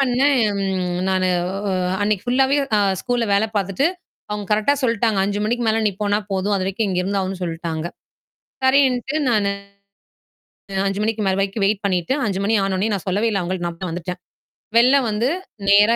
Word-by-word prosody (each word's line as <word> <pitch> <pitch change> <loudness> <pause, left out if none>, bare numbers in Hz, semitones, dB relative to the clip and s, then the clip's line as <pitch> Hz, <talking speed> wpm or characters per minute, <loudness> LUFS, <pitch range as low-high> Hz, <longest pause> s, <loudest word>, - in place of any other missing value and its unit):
பண்ணேன்? 270 +1 +3 0.7
நானு 185 -1 +1 0.7
அன்னைக்கு 205 0 0
ஃபுல்லாவே 270 +1 +3 0.2
அ - - +3 0.2
ஸ்கூல்ல 245 -2 0
வேலை 220 +2 +2
பாத்துட்டு 195 - 0 0.4
அவங்க 210 -1 -3
கரெக்ட்டா 215 +7 +3
சொல்டாங்க. 230 -3 +1
5:00 205 +1 -1
மணிக்கு 240 +2 0
மேல 220 +1 +2
நீ - - +3
போனா 205 0 +2
போதும். 195 +2 0
அதுவரைக்கும் 195 +3 -1
இங்க 180 -1 -1
இருந்தாகனுன்னு 190 -1 -2
சொல்டாங்க. 165 -1 -4 0.8
சரின்ட்டு 265 0 +3
நானு 210 -4 +2 1.4
5:00 195 +1 -1
மணிக்கு 220 0 -1
மேல 190 -1 +2
வரைக்கும் 195 +1 0
வெயிட் 205 0 0
பண்ணிட்டு, 180 +4 0
5:00 195 -2 -1
மணி 220 - +2
ஆன 195 -1 -1
உடனே 205 +4 0
நான் 195 - -5
சொல்லவே 205 +5 +1
இல்ல 200 - 0
அவங்களுக்கு. 175 0 -3
நான் 170 +1 -9
பா 185 - -2
வந்துட்டேன். 180 +2 -5 0.6
வெளில 255 +4 +6
வந்து, 215 +4 0 0.4
நேரா 210 +3 +6
205 Hz, 160 wpm, -21 LUFS, 190-230 Hz, 1.4 s, வெளில